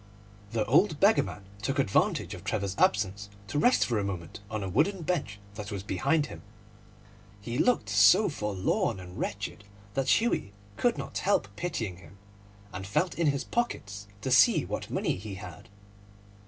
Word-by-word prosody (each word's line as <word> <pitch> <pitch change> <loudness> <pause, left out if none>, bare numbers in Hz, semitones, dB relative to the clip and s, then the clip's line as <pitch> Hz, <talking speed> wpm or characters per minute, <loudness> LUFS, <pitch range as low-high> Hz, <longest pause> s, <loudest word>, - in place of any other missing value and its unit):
The 110 0 0
old 155 - +3
beggar 205 +3 +5
man 100 - -7 0.2
took 135 +7 -1
advantage 130 -8 +1
of - - -9
Trevor's 100 -3 -2
absence 100 +1 +1 0.2
to 145 +8 -2
rest 245 +10 +4
for 115 -3 0
a - - -1
moment 90 -4 -5
on 110 -1 -3
a - - -3
wooden 165 - +1
bench 150 - -2
that 105 0 -7
was 100 -2 -4
behind 140 - +1
him. - - -10 1.0
He 115 +5 -4
looked 245 - +2
so 105 - +6
forlorn 105 - -1
and 90 0 -9
wretched 100 0 -4 0.3
that 135 +3 +3
Hughie 220 - -1 0.2
could - - +1
not - - -4
help 100 - +1
pitying 110 - -3
him, 95 +1 -16 0.6
and 95 +1 -6
felt 150 - +1
in 170 -2 0
his 140 -1 +1
pockets 100 - -3
to - - -2
see - - +6
what - - -4
money - - -1
he 100 +1 -7
had. 100 +2 -10
105 Hz, 170 wpm, -29 LUFS, 100-145 Hz, 1.0 s, so